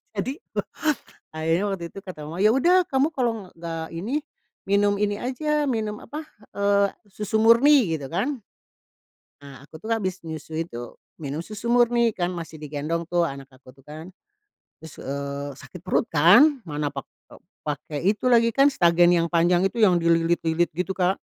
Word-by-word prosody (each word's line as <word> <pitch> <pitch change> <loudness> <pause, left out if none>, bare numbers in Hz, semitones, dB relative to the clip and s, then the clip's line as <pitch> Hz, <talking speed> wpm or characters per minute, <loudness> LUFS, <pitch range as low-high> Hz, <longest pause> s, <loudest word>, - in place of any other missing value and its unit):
Jadi 260 - -3 1.0
akhirnya 165 +5 0
waktu 180 -3 -4
itu - - -11
kata 155 -6 -8
mama, 170 +3 -7
"yaudah 280 +12 +4
kamu 270 +2 +2
kalau 225 -7 -2
nggak 165 -1 -6
ini, 230 - -2 0.5
minum 200 0 +2
ini 205 0 0
aja, 295 +4 -1
minum 215 -3 -2
apa 300 +2 -7 0.3
eee, 200 0 +2 0.2
susu 210 +2 -2
murni" 230 - +5
gitu 145 -4 -5
kan. 250 - -1 1.0
Ah, 140 -1 -13
aku 160 - -12
tuh 225 - -4
habis 190 -4 -2
nyusui 160 +1 -5
tuh 120 -3 -8 0.3
minum 145 +2 -4
susu 215 +2 -7
murni 240 -1 +4
kan 175 0 -1
masih 165 -2 -7
digendong 155 +3 -4
tuh 175 0 +1
anak 135 0 -7
aku 130 0 -18
tuh 135 - -22
kan. 155 +4 -9 0.7
Terus, 160 -2 -11
eee, 140 +1 -4
sakit 180 +3 -12
perut 185 - +1
kan, 235 - +6
mana 150 -2 -3
pak 135 - -6 0.3
eee, - - -16 0.2
pake 150 0 -4 0.2
itu 215 - -9
lagi 230 -1 +5
kan 275 +4 +5
stagen 175 -3 +4
yang 170 -1 +2
panjang 175 +1 +3
itu - - -13
yang 185 -4 +5
dililit-lilit 165 0 +2
gitu, 180 +3 -2
Kak. 185 +1 +1
180 Hz, 165 wpm, -24 LUFS, 160-225 Hz, 1.0 s, kan